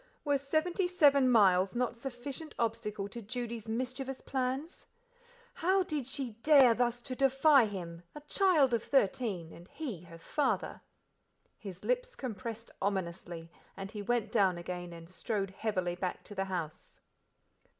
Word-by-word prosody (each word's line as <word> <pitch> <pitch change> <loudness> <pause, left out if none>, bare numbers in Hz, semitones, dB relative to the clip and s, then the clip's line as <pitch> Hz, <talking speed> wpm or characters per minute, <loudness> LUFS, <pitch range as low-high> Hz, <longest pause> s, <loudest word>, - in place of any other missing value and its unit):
Were 285 -1 +2
seventy 330 +6 0
seven 285 -7 +5
miles 195 -4 +5
not 245 0 0
sufficient 270 +5 -6
obstacle 210 -3 -2
to 235 +4 -7
Judy's 230 0 -5
mischievous 255 +3 -3
plans? 265 +5 -3 0.7
How 375 +3 +2
did 300 -7 -3
she 270 -3 -3
dare 275 -5 +7
thus 240 0 0
to 260 - -4
defy 270 -1 +5
him, 170 -4 -6
a 295 - -7
child 300 -4 +3
of 230 - +2
thirteen: 200 -9 0
and 175 +1 -13
he 250 - -6
her 170 -1 -12
father? 245 - -1 0.8
His 190 -4 -9
lips - - 0
compressed 230 -1 -6
ominously, 170 -3 -3 0.3
and 195 +1 -6
he 210 -2 -5
went 235 +2 0
down 190 -5 +3
again 175 0 -5
and 165 -1 -10
strode 195 +1 -3
heavily 190 -3 -1
back 180 +1 -4
to - - -10
the 195 -1 -1
house. 170 -5 -5
235 Hz, 145 wpm, -32 LUFS, 190-275 Hz, 0.8 s, dare